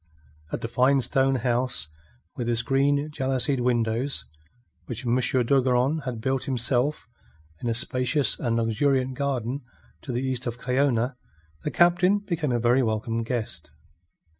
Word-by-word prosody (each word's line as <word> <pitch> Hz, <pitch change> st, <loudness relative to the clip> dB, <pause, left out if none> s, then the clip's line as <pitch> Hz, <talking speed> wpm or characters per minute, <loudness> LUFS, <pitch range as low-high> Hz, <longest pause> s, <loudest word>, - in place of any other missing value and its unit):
At -, -, -3 dB
the -, -, -2 dB
fine 130 Hz, +4 st, +3 dB
stone 135 Hz, +2 st, +2 dB
house, 125 Hz, -5 st, 0 dB, 0.5 s
with 120 Hz, -1 st, -3 dB
its 115 Hz, 0 st, +3 dB
green 140 Hz, +2 st, +1 dB
jalousied 135 Hz, -1 st, 0 dB
windows, 120 Hz, -, 0 dB, 0.6 s
which 120 Hz, +1 st, -5 dB
M. 120 Hz, -, +1 dB
d'Ogeron 130 Hz, +3 st, +2 dB
had 125 Hz, -3 st, -4 dB
built 130 Hz, +2 st, -1 dB
himself 130 Hz, +1 st, 0 dB, 0.5 s
in 120 Hz, -, -2 dB
a 115 Hz, -, 0 dB
spacious 125 Hz, +2 st, +1 dB
and 120 Hz, -2 st, 0 dB
luxuriant 130 Hz, +3 st, +1 dB
garden 135 Hz, -1 st, -2 dB, 0.4 s
to 130 Hz, -, -6 dB
the 125 Hz, +2 st, -2 dB
east 130 Hz, -1 st, -2 dB
of 120 Hz, 0 st, -3 dB
Cayona, 125 Hz, -1 st, 0 dB, 0.4 s
the -, -, -2 dB
Captain 175 Hz, +4 st, +4 dB
became 170 Hz, -8 st, -2 dB
a 120 Hz, -, +2 dB
very 120 Hz, +3 st, +3 dB
welcome 115 Hz, 0 st, -1 dB
guest. 115 Hz, -1 st, -4 dB
125 Hz, 140 wpm, -25 LUFS, 120-140 Hz, 0.6 s, Captain